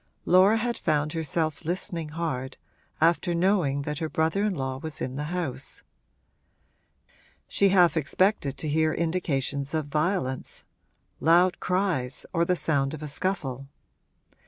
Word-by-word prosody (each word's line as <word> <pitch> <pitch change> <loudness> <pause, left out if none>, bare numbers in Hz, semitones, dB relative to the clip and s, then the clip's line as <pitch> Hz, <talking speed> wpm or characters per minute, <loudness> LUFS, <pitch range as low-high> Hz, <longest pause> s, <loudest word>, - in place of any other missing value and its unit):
Laura 190 +5 +6
had 235 +1 -2
found 150 0 0
herself 160 -1 -1
listening 170 -1 -3
hard, 135 -5 -4 0.4
after 170 +2 +2
knowing 170 -6 +2
that 150 0 -4
her 160 - -2
brother 160 +6 +1
in 210 -3 0
law 130 -2 -3
was 155 +1 -6
in 130 - -4
the 145 +2 -3
house: 150 -6 -4 1.6
she 200 - +3
half 180 -3 +5
expected 155 -1 +1
to 155 - -4
hear 155 +1 +2
indications 150 -4 -1
of 155 -2 0
violence 150 -2 -1 0.6
loud 175 +4 +4
cries 180 -9 0
or 170 -1 +2
the 180 +1 +2
sound 145 -3 0
of 155 - -9
a - - -4
scuffle. 140 -5 -2
160 Hz, 135 wpm, -26 LUFS, 140-180 Hz, 1.6 s, Laura